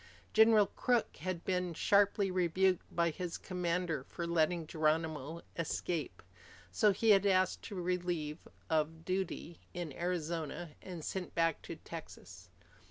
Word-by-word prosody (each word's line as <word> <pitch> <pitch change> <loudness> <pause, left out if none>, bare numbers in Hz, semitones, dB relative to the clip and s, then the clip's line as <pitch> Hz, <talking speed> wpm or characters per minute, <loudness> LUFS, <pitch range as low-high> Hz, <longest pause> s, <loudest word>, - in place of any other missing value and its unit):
General 220 -1 +7
Crook 240 +3 0
had 175 +1 -4
been 180 -2 0
sharply 200 +1 +3
rebuked 185 +1 +2
by 170 -1 +1
his 175 +2 -4
commander 175 -4 -1
for 170 +5 -5
letting 170 0 +1
Geronimo 155 0 -1
escape. 160 - -3 0.5
So 205 - +4
he 215 +3 +3
had 200 0 +5
asked 185 -1 +3
to 205 - -6
be 180 - -3
relieved 175 -3 -2 0.2
of 160 +1 0
duty 185 -2 -3 0.2
in 175 -5 -4
Arizona 170 -1 -3
and 175 -4 -7
sent 190 -2 -4
back 165 -2 +2
to - - -7
Texas. 90 0 -10
175 Hz, 135 wpm, -34 LUFS, 160-185 Hz, 0.5 s, General